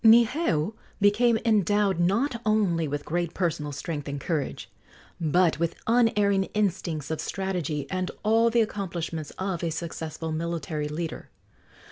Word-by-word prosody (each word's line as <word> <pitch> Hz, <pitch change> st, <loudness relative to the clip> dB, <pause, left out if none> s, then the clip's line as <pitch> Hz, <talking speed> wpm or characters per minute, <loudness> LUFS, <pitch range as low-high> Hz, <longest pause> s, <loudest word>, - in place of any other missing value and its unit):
Niheu 225 Hz, -, +4 dB, 0.3 s
became 220 Hz, +3 st, +4 dB
endowed 205 Hz, -3 st, +3 dB
not 230 Hz, +8 st, +1 dB
only 200 Hz, -7 st, +2 dB
with 145 Hz, 0 st, -3 dB
great 170 Hz, +1 st, -2 dB
personal 160 Hz, -5 st, -1 dB
strength 145 Hz, +1 st, -4 dB
and 140 Hz, 0 st, -3 dB
courage, 150 Hz, -1 st, -2 dB, 0.5 s
but 170 Hz, +1 st, +3 dB
with 170 Hz, 0 st, 0 dB
unerring 210 Hz, -4 st, +3 dB
instincts 170 Hz, -7 st, -1 dB
of 160 Hz, -, -2 dB
strategy 175 Hz, -7 st, -2 dB
and 185 Hz, 0 st, -1 dB
all 225 Hz, +2 st, +4 dB
the 230 Hz, 0 st, +3 dB
accomplishments 170 Hz, -7 st, -3 dB
of 190 Hz, -2 st, -2 dB
a 170 Hz, -, +1 dB
successful 160 Hz, -1 st, -4 dB
military 155 Hz, -2 st, -2 dB
leader. 160 Hz, +2 st, -5 dB
175 Hz, 130 wpm, -27 LUFS, 160-210 Hz, 0.5 s, Niheu